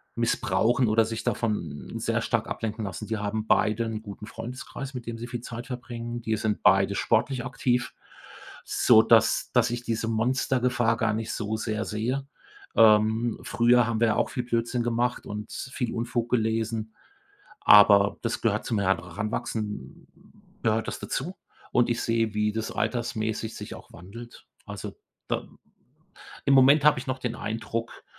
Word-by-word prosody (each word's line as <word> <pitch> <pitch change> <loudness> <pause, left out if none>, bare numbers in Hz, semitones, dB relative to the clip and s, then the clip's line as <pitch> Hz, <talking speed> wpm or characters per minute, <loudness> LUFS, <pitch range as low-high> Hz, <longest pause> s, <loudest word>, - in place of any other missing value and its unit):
missbrauchen 120 +2 +1
oder 110 +1 +3
sich 115 0 -4
davon 105 -10 -3
sehr - - 0
stark - - -1
ablenken 110 0 -4
lassen. 100 +2 -6
Die 110 - -2
haben 105 +1 -3
beide 110 +2 +2
'n 110 -1 -4
guten 105 0 -9
Freundeskreis, 130 +4 -7
mit 125 -2 -6
dem 115 0 -4
sie 120 +1 -6
viel 120 -1 -5
Zeit 120 +1 -7
verbringen. 120 -2 -6
Die 110 -1 -1
sind 105 0 -2
beide 95 0 +4
sportlich 130 +4 +1
aktiv, 125 -1 -1 0.7
sodass 110 -1 +4
dass 120 -1 +4
ich 120 0 -3
diese 115 -1 -2
Monstergefahr 120 0 +1
gar 115 -3 +1
nicht 110 +1 -3
so 110 0 -2
sehr 110 0 -2
sehe. 125 +6 -2 0.5
Ähm, 110 +1 +4
früher 120 +1 +3
haben 115 -1 -1
wir 115 - +5
ja 110 - +2
auch - - +1
viel 125 - -3
Blödsinn 120 0 -1
gemacht 120 +1 -1
und 105 +1 -6
viel 125 -2 -4
Unfug 120 0 -2
gelesen, 110 -1 -1 0.7
aber 100 -1 +7
das 115 0 -2
gehört 110 -2 +1
zum 110 -4 0
Heranwachsen 100 - -3 0.5
gehört 110 0 +1
das - - -4
dazu. 180 +3 -4 0.4
Und 120 0 +3
ich 120 - 0
sehe, 115 -2 0
wie 105 0 +1
das 110 +1 -3
altersmäßig 110 -1 -2
sich - - -7
auch - - -13
wandelt. 115 +8 -12 0.2
Also, - - -7 0.3
da - - -2 1.0
Im 140 - +4
Moment 140 +3 +6
habe 150 -3 +5
ich 125 - -7
noch 130 0 -2
den 120 -2 -3
Eindruck, 115 +1 -5
115 Hz, 160 wpm, -26 LUFS, 110-120 Hz, 1.0 s, aber